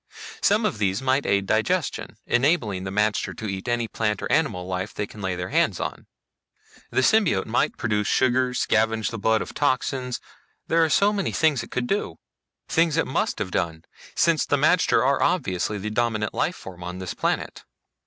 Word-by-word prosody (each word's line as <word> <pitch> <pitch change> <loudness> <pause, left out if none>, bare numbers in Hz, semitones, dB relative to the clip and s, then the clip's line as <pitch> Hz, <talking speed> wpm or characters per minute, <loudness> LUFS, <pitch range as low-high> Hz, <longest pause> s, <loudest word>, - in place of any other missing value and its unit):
Some 210 +2 +3
of 115 - -1
these 100 -1 +1
might 135 +1 +1
aid 100 -1 +2
digestion, 110 - -1
enabling 120 - +1
the - - -3
magter 105 +1 0
to 110 - -6
eat 95 +2 -5
any 120 -1 0
plant 105 -2 -1
or - - -3
animal 90 0 +1
life 95 +2 -4
they 105 - -2
can 105 +1 -12
lay 95 -2 -1
their 90 +1 -4
hands - - +1
on. - - -5 0.8
The - - +1
symbiote 170 - +3
might - - 0
produce 105 -2 0
sugars, 130 -1 +2
scavenge 110 0 +1
the 115 - -5
blood 110 +2 +2
of - - -10
toxins 130 -2 -1 0.5
there 165 0 +3
are 160 - +2
so 200 +6 +3
many 200 -4 -1
things 155 -7 +2
it 115 - -9
could 125 -1 -2
do. 200 +11 -2 0.5
Things 165 -1 +2
it 165 - +2
must - - -1
have 100 -4 -3
done, 80 -2 -2 0.3
since 165 -2 +3
the 145 - +1
magter 155 0 +3
are 140 +1 +2
obviously 105 - 0
the 105 +2 -4
dominant 110 -2 0
life - - 0
form 90 -2 -10
on 90 +1 -6
this 95 -1 -5
planet. - - -2
115 Hz, 190 wpm, -24 LUFS, 100-145 Hz, 0.8 s, Some